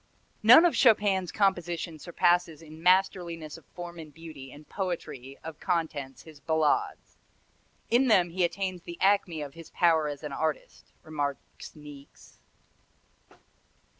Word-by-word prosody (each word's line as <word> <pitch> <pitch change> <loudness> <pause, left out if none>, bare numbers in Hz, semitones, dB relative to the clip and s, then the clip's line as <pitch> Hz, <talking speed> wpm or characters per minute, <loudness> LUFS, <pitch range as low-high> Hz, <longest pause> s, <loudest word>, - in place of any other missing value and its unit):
"None 245 +10 +8
of 345 - +2
Chopin's 205 -7 +3
compositions 175 -5 -1
surpasses 175 -2 +1
in 155 0 -13
masterliness 175 -3 +1
of 165 - -15
form 175 -1 -8
and 155 -2 -10
beauty 155 -4 -11
and 150 +2 -14
poetry 150 -8 -5
of 160 -1 -8
contents 155 -7 -3
his 155 -2 -14
ballades. 160 -1 -1 0.7
In 250 +3 +4
them 180 -7 +4
he 180 +1 0
attains 185 +1 -2
the 170 0 -9
acme 190 -5 +2
of 140 -1 -9
his 165 -1 -12
power 165 -3 +2
as 145 0 -6
an 150 - -5
artist," 155 0 -4
remarks 145 -2 -5
Niecks. 145 -2 -14
165 Hz, 135 wpm, -28 LUFS, 150-180 Hz, 0.7 s, None